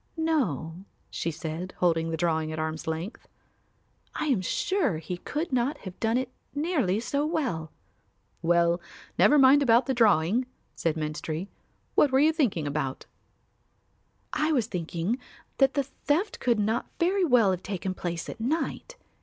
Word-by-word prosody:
No," 190 - -1 0.3
she 165 - -2
said, 160 +3 -5
holding 165 -2 +2
the 165 - -2
drawing 160 -2 0
at 155 - -5
arm's 155 0 -3
length, 165 +7 -4 0.9
"I - - -1
am 260 -10 +2
sure 325 - 0
he 170 +3 -5
could 300 - -4
not 255 +4 +1
have 185 -1 -8
done 225 +1 +1
it 260 0 -2 0.2
nearly 285 - +1
so 280 +5 -1
well." 260 - -2 0.7
"Well, 170 +1 +3 0.4
never 295 - +6
mind 275 +1 +7
about 240 -2 +5
the 265 - 0
drawing," 225 0 +3 0.3
said 165 -2 -1
Menstrie; 155 +4 -3 0.4
"what 290 - +4
were 265 - +4
you 310 +3 +5
thinking 225 - +1
about?" 140 -2 -3 1.3
"I 310 +1 +1
was 255 -8 +2
thinking 180 +3 -2 0.4
that 270 0 +4
the 280 - +2
theft 295 - -1
could 240 -2 +2
not 220 +3 0
very 375 +3 +2
well 245 - +5
have 185 -1 -2
taken 190 -1 -3
place 175 -2 -4
at - - -7
night. 320 - -2
215 Hz, 155 wpm, -27 LUFS, -, 1.3 s, mind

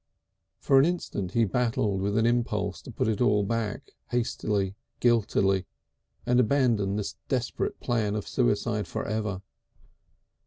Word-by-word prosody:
For 135 -1 +4
an 135 - +6
instant 105 - -2
he 115 -1 +3
battled 105 -2 0
with 100 +2 0
an 110 - +3
impulse 105 -4 0
to - - -10
put 110 - -1
it 110 0 0
all 105 -4 +3
back, 110 0 -3 0.2
hastily, 105 -5 -1 0.3
guiltily, 100 -5 +2 0.6
and 125 0 +3
abandon 115 -6 +2
this 105 -1 -3
desperate 125 -2 -1
plan 110 -4 0
of 105 - -4
suicide - - 0
for - - -4
ever. 105 -3 -2
110 Hz, 140 wpm, -27 LUFS, 100-120 Hz, 0.6 s, an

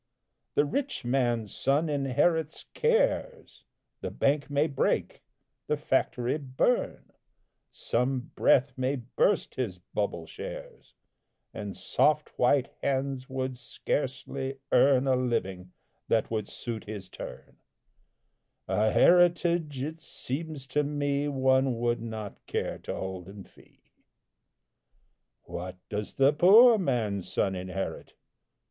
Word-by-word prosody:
The 145 - +4
rich 270 - -3
man's 120 -4 0
son 145 +4 +1
inherits 145 +3 0
cares. 480 0 0 0.3
The - - -4
bank 145 +1 0
may 145 +1 +2
break, 140 -4 -1 0.5
the 150 - +1
factory 130 -1 0
burn, 140 - -1 0.6
Some 125 +1 -2
breath 135 +2 +3
may 130 +2 0
burst 130 - 0
his 110 -8 -3
bubble 90 -1 -3
shares, - - -9 0.6
And 105 -2 -6
soft 150 0 +2
white 130 +2 +3
hands 135 -1 -1
would 130 -1 -3
scarcely 135 +1 -3
earn 130 +1 +5
A 130 -1 +3
living 95 -8 -2 0.4
that 115 -1 +1
would 110 -2 -2
suit 115 -2 -6
his 105 -3 -7
turn; - - -10 1.1
A 105 +4 +2
heritage, 170 -3 +3
it 160 +3 -5
seems 145 +1 -5
to 150 +2 0
me, 145 0 -1
One 130 -2 +2
would 120 0 0
not 110 -3 -7
care - - -2
to - - -5
hold 95 -2 -5
in 100 0 -10
fee. - - -22 1.6
What 90 +1 -6
does 105 0 -4
the 135 +2 +4
poor 220 +8 +7
man's 110 - -1
son 95 - +1
inherit? 95 +1 -5
130 Hz, 115 wpm, -28 LUFS, 115-145 Hz, 1.6 s, poor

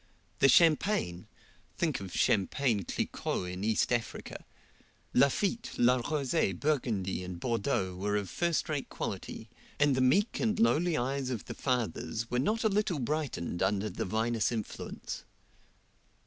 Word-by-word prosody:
The 135 - +6
champagne 160 - +3 0.5
think 160 -5 0
of 95 -2 -7
champagne 105 0 +2
Cliquot - - -2
in 90 +2 -5
East 110 +3 +2
Africa! 115 -2 -3 0.7
Lafitte, 185 - +2
La 125 +1 +5
Rose, 130 -6 0
Burgundy, 110 - -1
and 90 -1 -6
Bordeaux 115 -5 -1
were 105 +3 -1
of 100 -2 -1
first 170 - 0
rate 145 -3 -3
quality, - - -5 0.3
and 145 -1 +4
the 130 - +1
meek 195 - +3
and 220 -1 +1
lowly 175 -7 +3
eyes 135 +1 -1
of 120 -5 -4
the - - -6
fathers 115 - -2
were 125 - +1
not 215 - +1
a - - +5
little 205 -4 +1
brightened 135 - -2
under 100 +2 +1
the - - -3
vinous 110 +3 0
influence. 110 -3 -5
125 Hz, 140 wpm, -31 LUFS, 105-155 Hz, 0.7 s, The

